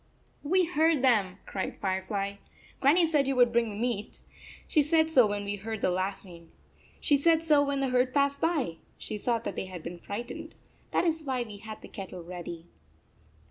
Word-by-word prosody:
" - - -28
We 370 -1 +5
heard 320 -4 +2
them, 205 -8 +3
"cried 190 - -4
Firefly. 195 +1 -2 0.2
" - - -26
Gran 280 +4 +5
nie 350 -1 +5
said 300 -4 +2
you 270 - +1
would 245 -1 +4
bring 230 -3 +1
meat. 235 -3 -2 0.5
She 305 - +4
said 315 +2 +2
so 255 -7 +6
when 205 0 -3
we 205 0 -3
heard 220 +1 -5
the - - +2
laughing. 185 -2 -4 0.5
She 290 - +3
said 320 +3 +4
so 300 -3 +4
when 280 -1 -1
the 270 - +1
herd 250 0 +2
passed 280 0 +1
by. 295 - 0 0.2
She 210 - -5
saw 235 +2 +1
that 230 - -5
they - - -3
had 180 -3 -8
been 175 +1 -7
frightened. 215 +7 -6 0.3
That - - +1
is 325 -1 +1
why 260 -4 -1
we 210 -3 -9
had 220 +1 -9
the - - -9
kettle 190 -4 -8
ready." 170 -1 -7
235 Hz, 200 wpm, -29 LUFS, 195-285 Hz, 0.5 s, so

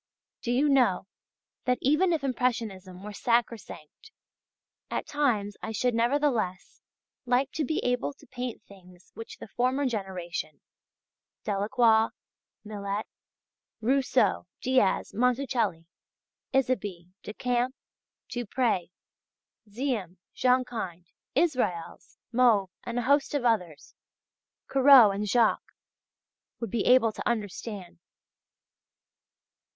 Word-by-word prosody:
Do 240 - -2
you 265 +5 +3
know 250 -12 +3 0.6
that 250 -1 +2
even 305 +7 +3
if 320 -4 0
Impressionism 220 -8 -2
were 210 0 -7
sacrosanct, 230 - -2 0.8
at - - -2
times 225 -9 0
I 220 - -4
should, 245 +3 0
nevertheless, 235 -6 0 0.5
like 255 +2 +2
to 310 - -2
be 310 +3 -1
able 245 -12 0
to - - -19
paint 245 -1 -6
things 180 -2 -18
which 225 - -9
the - - -9
former 255 +6 0
generation, 185 - -4 0.8
Delacroix, 220 +2 +3 0.6
Millet, 205 -1 -4 0.7
Rousseau, 250 -5 +2 0.2
Diaz, 255 -6 +2
Monticelli, 245 -7 0 0.7
Isabey, 205 -10 -1
Decamps, 245 +4 -1 0.5
Dupré, 240 -6 -1 0.8
Ziem, 210 -6 -3 0.2
Jonkind, 240 -9 0 0.3
Israels, 250 - -1
Mauve, 230 -6 +3
and 235 0 -4
a 245 - 0
host 285 +2 +2
of 270 -4 -1
others, 180 -10 -1 0.7
Corot, 265 -5 +7
and 205 +1 -3
Jacques... 235 -1 +2 0.8
would 230 -5 -4
be 230 - 0
able 250 -3 +5
to - - -5
understand. 205 -5 -4
235 Hz, 100 wpm, -28 LUFS, 200-255 Hz, 0.8 s, Corot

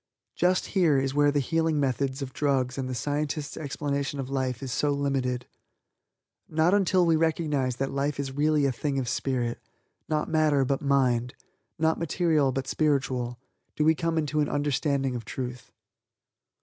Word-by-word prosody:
Just 180 +1 +2
here 170 -8 +4
is 135 0 0
where 145 0 +4
the 145 0 +1
healing 160 +2 +1
methods 135 0 -1
of 130 -1 -7
drugs 130 -3 0
and 130 -1 -3
the 130 - -3
scientist's 145 +3 -2
explanation 140 -1 -3
of 135 0 -4
life 130 -1 -2
is 130 - -4
so 145 +6 +1
limited. 135 -3 -1 1.0
Not 160 +3 +2
until 190 -3 +3
we 165 -1 +4
recognize 155 -5 0
that 135 +2 -2
life 140 +1 -1
is 135 -1 -2
really 150 +1 +2
a 135 - +2
thing 135 +3 -2
of 130 -2 -1
spirit 120 -1 -1 0.5
not 155 -1 0
matter 155 -4 +3
but 135 +2 0
mind 125 -4 +1 0.4
not 160 0 +1
material 160 -4 +2
but 135 0 -3
spiritual 135 -5 0 0.4
do 150 - +1
we 160 - +6
come 165 +1 -1
into 155 -1 0
an 145 - +1
understanding 140 -2 0
of 120 - -4
Truth. 125 +2 -6
140 Hz, 165 wpm, -27 LUFS, 130-155 Hz, 1.0 s, we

